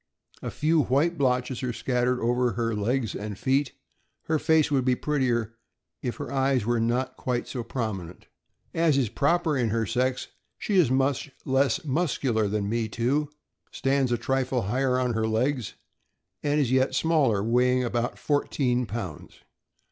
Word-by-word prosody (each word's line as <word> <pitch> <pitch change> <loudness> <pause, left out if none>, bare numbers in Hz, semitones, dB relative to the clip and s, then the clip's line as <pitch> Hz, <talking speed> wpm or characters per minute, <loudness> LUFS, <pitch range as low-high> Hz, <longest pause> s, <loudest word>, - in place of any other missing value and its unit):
A - - -4
few 155 +1 +2
white 145 +8 +2
blotches 125 -3 0
are 125 -2 -1
scattered 125 +1 0
over 120 +1 +1
her 115 -1 -1
legs 110 +2 -1
and 105 -1 -5
feet. 135 +3 +1 0.5
Her 160 -1 0
face 160 -1 +3
would 135 -3 +2
be 125 0 +2
prettier 125 -6 0 0.5
if 125 -3 -3
the - - -4
eyes 135 -4 +1
were 120 0 +1
not 120 +3 -1
quite 125 -1 -2
so 125 -3 -4
prominent. 100 -8 -5 0.5
As 165 -4 +3
is 125 -6 +1
proper 155 - +1
in 120 -4 +1
her 115 +1 0
sex, 125 +4 -1 0.3
she 205 - -2
is 175 -9 +5
much 135 +2 +1 0.2
less 135 0 +1
muscular 135 -7 0
than 100 0 -1
Me 115 +1 -1
Too, 135 +7 0 0.4
stands 135 -1 +1
a 120 - +2
trifle 130 0 0
higher 125 +5 +1
on 125 -2 0
her 110 0 0
legs, 125 +2 -1 0.7
and 145 +1 +1
is 130 -4 +1
yet 130 0 +2
smaller, 140 -11 +2
weighing 125 +2 +2
about 120 0 -2
fourteen 125 -4 0
pounds. 100 -7 -7
125 Hz, 160 wpm, -26 LUFS, 115-140 Hz, 0.7 s, is